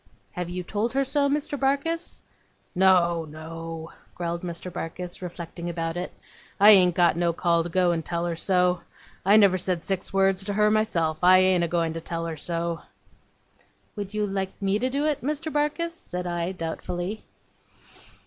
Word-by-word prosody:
'Have 180 -1 -4
you 180 +1 -4
told 215 +6 -2
her 275 +1 +2
so, 280 +1 +1
Mr. 290 0 -1
Barkis?' 280 +5 -1 0.5
'No 175 -3 +4
no,' 160 +1 -8 0.2
growled 170 -1 -3
Mr. 175 0 -5
Barkis, 175 +2 -5
reflecting 175 -1 -6
about 165 -1 -3
it. 180 +1 -4 0.5
'I 205 +2 +9
ain't 180 -4 +6
got 175 -2 +4
no 170 0 +1
call 170 0 +2
to 170 - -4
go 180 0 +2
and 165 -1 -1
tell 170 +1 -2
her 170 -1 -2
so. 180 0 +2 0.4
I 200 +3 +6
never 195 -3 +5
said 180 -2 -1
six 190 -1 -2
words 195 0 +2
to 205 - -1
her 210 +1 +3
myself, 170 -8 +1
I 185 +1 +8
ain't 185 -1 +4
a - - +1
goin' 165 -1 0
to 165 - -5
tell 165 0 -4
her 165 -1 -4
so.' 170 +1 -2 1.1
'Would 205 0 -6
you 210 0 +1
like 195 -1 -3
me 195 +1 +1
to 255 +3 0
do 280 +3 -1
it, 300 -2 0
Mr. 300 +4 -2
Barkis?' 300 +3 0
said 180 - -6
I, 175 0 -2
doubtfully. 175 +4 -4
180 Hz, 175 wpm, -25 LUFS, 170-210 Hz, 1.1 s, I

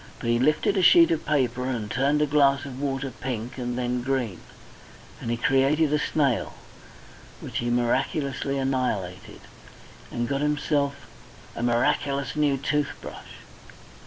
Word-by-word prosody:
But 115 - -1
he 120 - +2
lifted 155 - +2
a - - +3
sheet 340 - +7
of 335 - -1
paper, 130 -4 +1
and 115 -5 -3
turned 140 +4 +2
a - - +3
glass 140 -1 +3
of 135 -1 -7
water 135 -1 -2
pink 125 0 -5
and 120 0 -3
then 125 0 -1
green, 125 -8 -2 0.8
and - - -4
he 120 - 0
created 140 +5 +2
a 150 - +3
snail, 140 -5 0 0.8
which - - -5
he 120 - -1
miraculously 135 +3 0
annihilated, 125 -9 -2 0.7
and 120 0 -2
got 140 +1 -1
himself 145 -2 0 0.5
a - - -5
miraculous 120 +3 0
new 145 -2 +2
tooth 145 +1 -1
brush. - - -11
135 Hz, 145 wpm, -25 LUFS, 120-145 Hz, 0.8 s, sheet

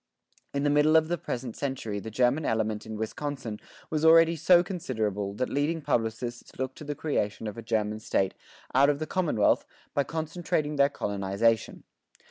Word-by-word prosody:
In 140 0 -1
the 145 - +3
middle 150 +2 +4
of 160 0 +4
the 175 - 0
present 125 -3 -4
century 125 -7 -3
the 110 - -7
German 125 +7 +2
element 110 -3 -1
in 110 -1 -5
Wisconsin 115 0 -4 0.3
was 155 -1 0
already 165 +1 +7
so 175 +3 +5
considerable 110 - -3
that 125 +4 -1
leading 150 +4 0
publicists 120 -4 -2
looked 130 0 -4
to - - -8
the 145 0 -4
creation 110 -9 -2
of 105 - -4
a 115 - -7
German 110 -1 -1
state 95 -3 0 0.4
out 140 +2 +5
of 145 - +2
the 155 - -3
commonwealth 155 - +2 0.3
by 140 - +2
concentrating 155 -1 -2
their 140 0 +5
colonization. 100 0 0
130 Hz, 170 wpm, -28 LUFS, 110-155 Hz, 0.4 s, already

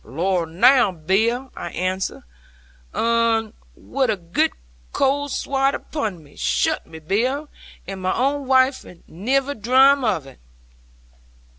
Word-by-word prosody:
'"Lor 170 - -1
now, 210 +7 +4
Bill!" 220 +10 0
I 175 - -6
answered 185 +2 -2 0.7
'un, 230 -1 +1 0.2
wi' 270 0 -2
a 220 -4 0
girt 170 -1 0 0.4
cold 285 +1 +1
swat 270 0 0
upon 210 - -4
me: 145 - -19
"shutt - - 0
me, 160 - -11
Bill; 245 - -1 0.4
and 195 -1 -6
my 185 0 0
own 275 +2 0
waife 260 0 +3 0.2
niver 265 - -1
drame 265 +4 +4
of 195 - 0
it!"' 135 - -15
225 Hz, 125 wpm, -22 LUFS, 185-270 Hz, 0.7 s, now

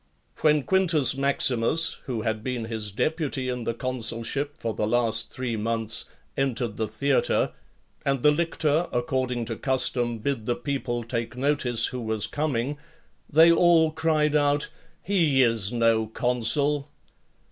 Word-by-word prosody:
When 150 -2 +3
Quintus 165 -9 +2
Maximus, 140 +3 +2
who 120 -4 -3
had 110 0 -2
been 125 -2 -3
his 110 -2 -3
deputy 140 - -1
in 125 -2 -4
the 115 - -2
consulship 130 +4 -2
for 115 -6 -3
the 105 - -2
last 115 -1 +2
three 125 -3 -3
months, 110 0 0 0.3
entered 125 -5 -1
the 110 - -1
theatre, 135 +6 +1 0.5
and 135 -2 -1
the 150 - +6
lictor, 160 0 0
according 125 -1 -1
to 115 0 -4
custom, 125 -2 -1
bid 115 -1 -3
the 120 - +1
people 130 -4 -3
take 115 0 -4
notice 125 -4 +1
who 125 -1 -4
was 110 -2 -1
coming, 145 -1 -2 0.5
they 160 +3 +6
all 170 -2 +4
cried 155 -2 +1
out, 145 0 +2 0.3
"He 165 -9 +3
is 115 -4 +1
no 115 -2 +2
consul." 140 +6 +1
130 Hz, 140 wpm, -25 LUFS, 115-145 Hz, 0.5 s, the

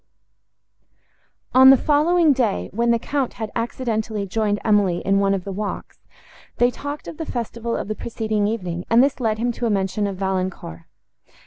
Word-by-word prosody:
On 260 +1 +8
the 270 - +8
following 310 +3 +3
day, 240 -7 -1
when 235 +3 +1
the 235 - +4
Count 270 +2 -2
had 220 -2 -6
accidentally 225 -3 -2
joined 205 +1 -1
Emily 205 -5 +3
in 195 0 +3
one 195 0 +2
of 190 - -4
the 195 - -6
walks, 205 +2 -5 0.6
they 245 +1 +3
talked 285 +3 -7
of 315 - -8
the 320 - -5
festival 235 -1 -3
of - - -4
the 215 - -2
preceding 215 -2 -2
evening, 180 -6 -3
and 235 +2 +6
this 275 0 0
led 220 -3 0
him 240 +2 0
to 235 0 -3
a - - 0
mention 200 0 0
of 200 - -4
Valancourt. 185 - -3
220 Hz, 180 wpm, -22 LUFS, 200-245 Hz, 0.6 s, On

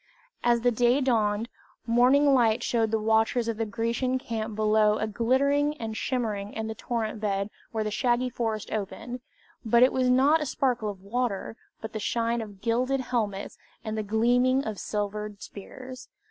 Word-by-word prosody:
As 240 -1 +3
day 245 +2 +3
dawned, 225 -4 +1 0.4
morning 255 +5 +4
light 235 -2 +3
showed 225 -2 +1
the 225 - +1
watchers 225 +2 +2
of 230 -2 -2
the 225 0 -1
Grecian 235 +4 -1
camp 225 -4 -4
below 215 0 +3
a 220 - -1
glittering 280 +7 +1
and 220 -3 -5
shimmering 215 -5 -2
in 220 - -3
the 220 - -4
torrent 220 -1 -3
bed 200 -1 -1 0.2
where 220 -1 -1
the 215 - -3
shaggy 240 +3 +1
forests 225 -3 -3
opened; 220 +4 -4 0.4
but 235 +1 +5
it 255 - +4
was 255 -1 +2
not 275 +5 +5
the 300 - -3
sparkle 245 -5 0
of 190 -2 -8
water, 225 0 -2 0.3
but 220 - -7
the 215 - -3
shine 230 +2 0
of 205 -3 -10
gilded 255 +4 +1
helmets 215 -6 -3 0.2
and 220 -1 -4
the 215 - -1
gleaming 245 +5 +2
of 215 -3 -4
silvered 210 0 -4
spears. 255 +6 -10
230 Hz, 170 wpm, -27 LUFS, 215-250 Hz, 0.4 s, but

